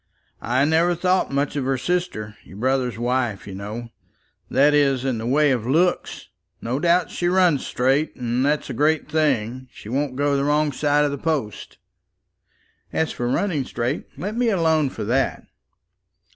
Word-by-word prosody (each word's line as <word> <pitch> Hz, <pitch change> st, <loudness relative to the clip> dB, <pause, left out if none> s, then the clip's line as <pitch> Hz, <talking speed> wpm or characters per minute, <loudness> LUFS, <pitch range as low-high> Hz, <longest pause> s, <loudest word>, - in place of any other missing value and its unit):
I 130 Hz, +4 st, +1 dB
never 165 Hz, +3 st, +2 dB
thought 180 Hz, 0 st, +1 dB
much 140 Hz, +2 st, -1 dB
of 140 Hz, -3 st, -1 dB
her 135 Hz, 0 st, 0 dB
sister, 125 Hz, -9 st, -2 dB
your 95 Hz, -, -13 dB
brother's 125 Hz, 0 st, 0 dB
wife, 120 Hz, -3 st, -1 dB
you 100 Hz, -, -8 dB
know, 105 Hz, +5 st, -6 dB, 0.6 s
that 145 Hz, +2 st, +4 dB
is 135 Hz, -3 st, +2 dB
in 130 Hz, -4 st, -1 dB
the 115 Hz, -, -4 dB
way 145 Hz, +3 st, +3 dB
of 120 Hz, -3 st, -1 dB
looks. 175 Hz, +7 st, 0 dB, 0.3 s
No 125 Hz, +4 st, -2 dB
doubt 175 Hz, +3 st, +2 dB
she 175 Hz, -, -1 dB
runs 180 Hz, -5 st, +3 dB
straight, 135 Hz, +5 st, +1 dB
and 125 Hz, 0 st, -1 dB
that's 150 Hz, +2 st, 0 dB
a 135 Hz, -, -5 dB
great 150 Hz, +5 st, +1 dB
thing. 130 Hz, -5 st, 0 dB
She 105 Hz, -, -11 dB
won't 135 Hz, +1 st, -1 dB
go 145 Hz, +1 st, +1 dB
the 140 Hz, -, +1 dB
wrong 150 Hz, +1 st, +2 dB
side 145 Hz, +1 st, +2 dB
of 145 Hz, -, 0 dB
the 140 Hz, -, -5 dB
post." 145 Hz, -10 st, -3 dB, 1.1 s
"As 160 Hz, -, 0 dB
for 120 Hz, -, -3 dB
running 155 Hz, 0 st, 0 dB
straight, 125 Hz, +3 st, -3 dB
let 200 Hz, +8 st, -4 dB
me 240 Hz, -1 st, +2 dB
alone 160 Hz, -7 st, +2 dB
for -, -, -6 dB
that." 125 Hz, +5 st, 0 dB
140 Hz, 170 wpm, -22 LUFS, 125-155 Hz, 1.1 s, that